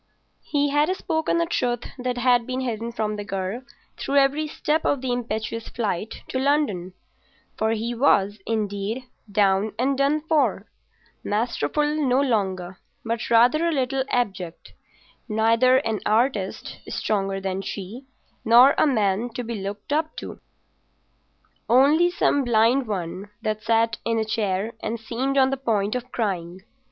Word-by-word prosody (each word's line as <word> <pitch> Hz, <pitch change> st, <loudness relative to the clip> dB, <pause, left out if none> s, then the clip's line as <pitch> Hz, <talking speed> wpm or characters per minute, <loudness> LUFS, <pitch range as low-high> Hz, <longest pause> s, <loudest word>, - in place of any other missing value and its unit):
He 290 Hz, -1 st, 0 dB
had 295 Hz, +3 st, +2 dB
spoken 325 Hz, -2 st, -1 dB
a 335 Hz, -, +2 dB
truth 245 Hz, -7 st, -1 dB, 0.2 s
that 250 Hz, 0 st, -2 dB
had 245 Hz, -1 st, +3 dB
been 255 Hz, 0 st, -2 dB
hidden 235 Hz, -2 st, -3 dB
from 215 Hz, -2 st, -2 dB
the 205 Hz, -, -4 dB
girl 195 Hz, +3 st, -4 dB, 0.4 s
through 280 Hz, -, -3 dB
every 280 Hz, +3 st, +3 dB
step 305 Hz, +1 st, -1 dB
of 285 Hz, -, +1 dB
the 260 Hz, -1 st, -2 dB
impetuous 230 Hz, -2 st, -3 dB
flight 215 Hz, -2 st, -3 dB
to 260 Hz, -, -1 dB
London; 265 Hz, -11 st, 0 dB, 0.6 s
for 220 Hz, +1 st, 0 dB
he 230 Hz, +2 st, -2 dB
was, 210 Hz, -5 st, +2 dB
indeed, 215 Hz, +2 st, -2 dB, 0.3 s
down 200 Hz, +1 st, +2 dB
and 265 Hz, +4 st, +1 dB
done 285 Hz, +2 st, +2 dB
for—masterful 240 Hz, -, -2 dB, 0.2 s
no 255 Hz, -1 st, +3 dB
longer 190 Hz, -8 st, -1 dB, 0.3 s
but 230 Hz, 0 st, -2 dB
rather 245 Hz, +8 st, +4 dB
a -, -, +1 dB
little 265 Hz, -2 st, 0 dB
abject; 190 Hz, -8 st, -3 dB, 0.6 s
neither 230 Hz, +4 st, +4 dB
an 225 Hz, -6 st, -1 dB
artist 215 Hz, -3 st, 0 dB
stronger 195 Hz, -2 st, -1 dB
than 190 Hz, 0 st, -3 dB
she, 210 Hz, +7 st, -7 dB, 0.4 s
nor 245 Hz, +5 st, +7 dB
a -, -, +5 dB
man 215 Hz, -3 st, +1 dB
to 245 Hz, -, -3 dB
be 235 Hz, 0 st, -5 dB
looked 205 Hz, +4 st, -5 dB
up 315 Hz, +1 st, 0 dB
to—only 285 Hz, +8 st, -2 dB
some 285 Hz, -5 st, +1 dB
blind 240 Hz, +2 st, +3 dB
one 190 Hz, 0 st, -4 dB
that 215 Hz, 0 st, -2 dB
sat 225 Hz, 0 st, +1 dB
in 230 Hz, 0 st, 0 dB
a 220 Hz, -, 0 dB
chair 215 Hz, -1 st, -1 dB
and 225 Hz, +1 st, -3 dB
seemed 255 Hz, +5 st, -2 dB
on 265 Hz, 0 st, +4 dB
the 270 Hz, -, -1 dB
point 215 Hz, -6 st, 0 dB
of 250 Hz, 0 st, -5 dB
crying. 185 Hz, -5 st, -3 dB
230 Hz, 145 wpm, -24 LUFS, 205-265 Hz, 0.6 s, nor